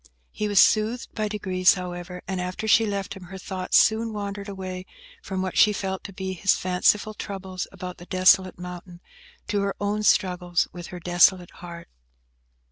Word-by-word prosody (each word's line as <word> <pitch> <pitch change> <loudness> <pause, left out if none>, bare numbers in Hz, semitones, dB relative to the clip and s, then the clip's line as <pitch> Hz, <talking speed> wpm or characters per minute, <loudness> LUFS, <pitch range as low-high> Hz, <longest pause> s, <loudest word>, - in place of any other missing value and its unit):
He 210 - -2
was 205 -2 +3
soothed 220 +5 +3
by 215 -1 -1
degrees, 185 -3 +2
however, 180 0 -7
and 190 -1 -2
after 185 +4 -4
she 220 +1 +5
left 200 -1 -3
him, 190 -2 -11
her 190 +2 -9
thoughts 185 0 0
soon 225 +1 +3
wandered 200 0 -5
away 185 -1 -6 0.3
from 190 -1 -3
what 185 - -4
she 210 - +7
felt 190 -1 -4
to 200 - -7
be 190 0 -5
his 190 +2 +2
fanciful 195 +4 +1
troubles 190 -3 -6
about 180 -1 -8
the 175 - -12
desolate 185 0 +4
mountain, 180 0 -9 0.5
to 205 -2 +1
her 200 0 -1
own 205 +1 -1
struggles 180 -4 +2
with 175 -1 -8
her 180 - -8
desolate 175 +1 +3
heart. 170 -1 -10
190 Hz, 175 wpm, -25 LUFS, 180-200 Hz, 0.5 s, she